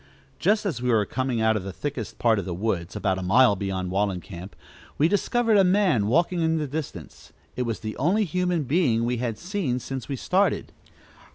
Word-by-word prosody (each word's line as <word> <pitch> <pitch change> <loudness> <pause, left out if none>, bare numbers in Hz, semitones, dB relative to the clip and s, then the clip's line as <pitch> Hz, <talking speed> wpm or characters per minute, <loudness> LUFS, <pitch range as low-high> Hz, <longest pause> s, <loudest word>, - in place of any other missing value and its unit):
Just 210 +1 +2
as 155 - -2
we 125 - 0
were 110 -3 +3
coming 130 0 -2
out 110 0 +3
of 110 - -1
the 95 +1 -6
thickest 130 +2 -5
part 115 -3 +3
of - - -4
the 90 -3 -4
woods, 95 -3 -2
about 95 -3 0
a - - -4
mile 105 +4 +5
beyond 95 -2 -3
Wallencamp, 95 -1 -3 0.4
we 150 - +4
discovered 225 +3 +2
a 195 - +6
man 180 - +3
walking 170 +7 +2
in 160 0 +2
the 155 - -1
distance. 145 +1 -7 0.2
It 125 -1 -2
was 115 - -3
the 110 -1 -5
only 185 +10 +2
human 180 -2 0
being 130 -6 +2
we 120 +1 0
had 115 -2 -2
seen 175 - -2
since 130 0 -6
we 140 - -1
started. 190 +9 0
125 Hz, 200 wpm, -25 LUFS, 105-170 Hz, 0.4 s, a